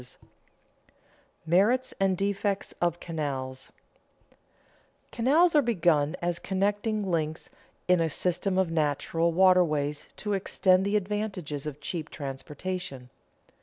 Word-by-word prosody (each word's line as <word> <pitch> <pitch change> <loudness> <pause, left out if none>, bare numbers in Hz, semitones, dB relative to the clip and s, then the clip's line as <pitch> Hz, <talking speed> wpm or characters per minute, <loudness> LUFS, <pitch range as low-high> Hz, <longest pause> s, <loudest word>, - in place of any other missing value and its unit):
[Sidenote: - - -14 1.2
Merits 205 +10 +2
and 190 -1 +2
defects 200 0 -1
of 175 -1 +1
canals] 135 -5 -4 1.4
Canals 305 +9 +3
are 300 - +6
begun 170 - +2
as 175 0 0
connecting 205 +2 -1
links 160 -1 -2 0.4
in 180 -2 +4
a 165 - +1
system 185 +4 -1
of 190 -3 +1
natural 165 +2 0
waterways 165 -5 +3
to 210 -1 -2
extend 190 -1 +2
the 205 - 0
advantages 190 -8 -2
of 150 -1 -6
cheap 165 -3 -4
transportation. 140 -1 -6
180 Hz, 110 wpm, -28 LUFS, 155-200 Hz, 1.4 s, are